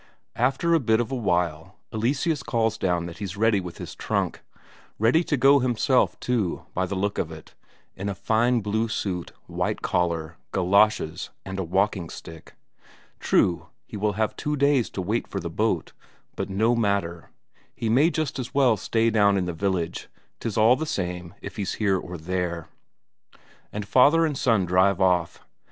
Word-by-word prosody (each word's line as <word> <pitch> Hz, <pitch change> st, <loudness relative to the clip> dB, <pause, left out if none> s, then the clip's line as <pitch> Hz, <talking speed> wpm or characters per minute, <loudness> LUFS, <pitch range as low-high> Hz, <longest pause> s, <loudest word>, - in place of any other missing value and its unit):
After 135 Hz, +8 st, +1 dB
a 165 Hz, -, +5 dB
bit 110 Hz, -4 st, +2 dB
of 120 Hz, +2 st, -2 dB
a -, -, -1 dB
while, 90 Hz, -4 st, -1 dB, 0.2 s
Eleseus 135 Hz, +7 st, 0 dB
calls 115 Hz, -3 st, 0 dB
down 90 Hz, -5 st, 0 dB
that 85 Hz, +2 st, -8 dB
he's 100 Hz, -2 st, -5 dB
ready 110 Hz, -1 st, +3 dB
with 90 Hz, -2 st, -7 dB
his -, -, -7 dB
trunk. -, -, -2 dB, 0.6 s
Ready 120 Hz, +10 st, +3 dB
to 150 Hz, -, 0 dB
go 140 Hz, +2 st, +6 dB
himself, 125 Hz, +1 st, +1 dB
too, 115 Hz, -8 st, -1 dB
by 95 Hz, 0 st, -1 dB
the 100 Hz, -, -3 dB
look 100 Hz, +2 st, -1 dB
of 80 Hz, -, -2 dB
it; 80 Hz, -1 st, -12 dB, 0.4 s
in 100 Hz, +2 st, -4 dB
a 100 Hz, -, -3 dB
fine 115 Hz, +5 st, +2 dB
blue 110 Hz, +2 st, 0 dB
suit, 95 Hz, -5 st, -3 dB
white -, -, -3 dB
collar, 85 Hz, -2 st, -1 dB
galoshes, 95 Hz, -3 st, +2 dB, 0.2 s
and 95 Hz, 0 st, -5 dB
a -, -, 0 dB
walking 95 Hz, 0 st, 0 dB
stick. 80 Hz, -1 st, -11 dB, 0.6 s
True, 85 Hz, -2 st, +2 dB, 0.2 s
he -, -, -10 dB
will 105 Hz, 0 st, 0 dB
have 110 Hz, +1 st, -1 dB
two 150 Hz, 0 st, -2 dB
days 140 Hz, -3 st, +2 dB
to 95 Hz, -, -4 dB
wait 110 Hz, +6 st, -1 dB
for -, -, -4 dB
the -, -, -5 dB
boat, -, -, -1 dB, 0.4 s
but -, -, -4 dB
no 110 Hz, +5 st, +2 dB
matter; 100 Hz, -7 st, -1 dB, 0.5 s
he 115 Hz, -, -3 dB
may 135 Hz, +9 st, +4 dB
just 155 Hz, -5 st, -2 dB
as 125 Hz, 0 st, -6 dB
well 130 Hz, -6 st, +4 dB
stay 115 Hz, +2 st, +1 dB
down 100 Hz, -2 st, +4 dB
in 95 Hz, -, 0 dB
the 90 Hz, -, -3 dB
village; 85 Hz, -1 st, -2 dB, 0.3 s
'tis 115 Hz, -2 st, -4 dB
all 110 Hz, +3 st, +6 dB
the 155 Hz, +4 st, -4 dB
same 90 Hz, -, -4 dB
if -, -, -8 dB
he's 100 Hz, -2 st, -2 dB
here 100 Hz, -3 st, +1 dB
or 90 Hz, 0 st, -7 dB
there. 85 Hz, -1 st, -3 dB, 1.0 s
And 105 Hz, -1 st, -5 dB
father 150 Hz, +8 st, +5 dB
and 150 Hz, -3 st, -1 dB
son 115 Hz, -7 st, +2 dB
drive 95 Hz, +2 st, +3 dB
off. 90 Hz, -3 st, +1 dB
100 Hz, 175 wpm, -25 LUFS, 90-120 Hz, 1.0 s, go